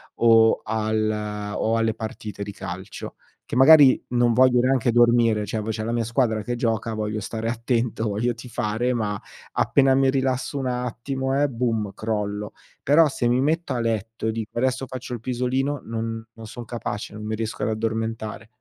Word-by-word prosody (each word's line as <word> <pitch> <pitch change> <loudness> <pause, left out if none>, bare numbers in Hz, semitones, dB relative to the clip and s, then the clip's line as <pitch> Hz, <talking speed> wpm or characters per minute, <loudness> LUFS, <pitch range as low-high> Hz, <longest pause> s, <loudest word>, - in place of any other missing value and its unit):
o 115 -1 +5
al 110 -1 -2
o 115 +1 +1
alle 115 -1 +1
partite 110 -2 -7
di 100 - -6
calcio. 95 0 -7 0.3
Che 125 - -3
magari 140 -1 +8
non 120 -1 +3
voglio 125 0 +5
neanche 130 -2 +2
dormire, 120 -3 +4
cioè 110 +2 -3
v 110 - -5
c'è 110 0 -4
la 115 - -2
mia 120 -1 0
squadra 115 -2 +1
che 120 +1 -2
gioca, 115 -1 -1
voglio 110 0 -2
stare 115 +2 -3
attento, 115 -1 -1
voglio 115 +4 0
tifare, 120 0 -2
ma 105 -4 -2 0.3
appena 135 -1 +3
mi 135 0 +3
rilasso 130 +1 -1
un 130 -1 -2
attimo, 125 +2 -2
eh, 145 - +2
boom, 115 -4 -1
crollo! 105 -2 -3 0.3
Però, 150 +2 +5
se 120 -2 -1
mi 125 +2 +2
metto 155 -1 0
a 120 - -1
letto 110 0 -2
dico: 110 0 -6
"Adesso 130 +1 0
faccio 130 0 -7
il 120 - -4
pisolino". 130 +3 -1
Non 115 0 -4
non 115 0 -11
son 120 +2 -8
capace, 110 -3 -5
non 105 0 -7
mi 110 0 -2
riesco 115 0 -4
ad - - +1
addormentare. 110 0 -3
115 Hz, 175 wpm, -24 LUFS, 110-125 Hz, 0.3 s, magari